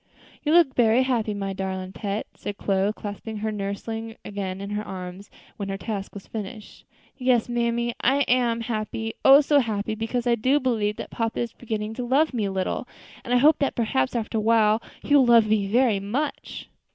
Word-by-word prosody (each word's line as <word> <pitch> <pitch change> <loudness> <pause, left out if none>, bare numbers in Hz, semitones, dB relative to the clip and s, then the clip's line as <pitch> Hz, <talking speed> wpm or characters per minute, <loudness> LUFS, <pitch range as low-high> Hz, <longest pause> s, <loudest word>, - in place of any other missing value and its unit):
"You 300 - 0
look 335 -6 +5
berry 235 +1 +4
happy, 230 -5 0
my 195 -1 -3
darlin' 190 -1 -4
pet," 205 0 -3
said 205 - -6
Chloe, 195 +1 +1
clasping 215 +1 -7
her 215 +1 -2
nursling 220 +2 -4
again 195 -2 -4
in 200 +1 -6
her 210 0 -1
arms 185 +1 -8 0.3
when 200 -2 -4
her 195 - -3
task 200 -1 -5
was 200 - -8
finished. 215 0 -8 0.3
"Yes, 250 -3 +2
mammy, 235 0 0
I 275 +3 +3
am 240 -3 +2
happy, 225 -1 -3
oh! 275 +2 +9
so 290 0 +4
happy, 215 -4 -1
because 225 +3 -2
I 240 - +3
do 255 +6 +2
believe 220 -6 0
that - - -7
papa 225 -1 -2
is 235 -1 -3
beginning 220 -2 -4
to 250 - -4
love 275 +5 +2
me 225 -4 0
a 195 - -2
little, 190 -1 -2 0.4
and 245 - -6
I 250 - +5
hope 295 +4 +5
that 280 - 0
perhaps, 175 - 0
after 225 -1 -1
a - - -1
while, 220 0 +3 0.2
he 290 - 0
will 265 -3 +6
love 230 -2 +6
me 210 -2 +1
very 230 -1 +3
much." 250 +10 -4
225 Hz, 200 wpm, -25 LUFS, 205-245 Hz, 0.4 s, oh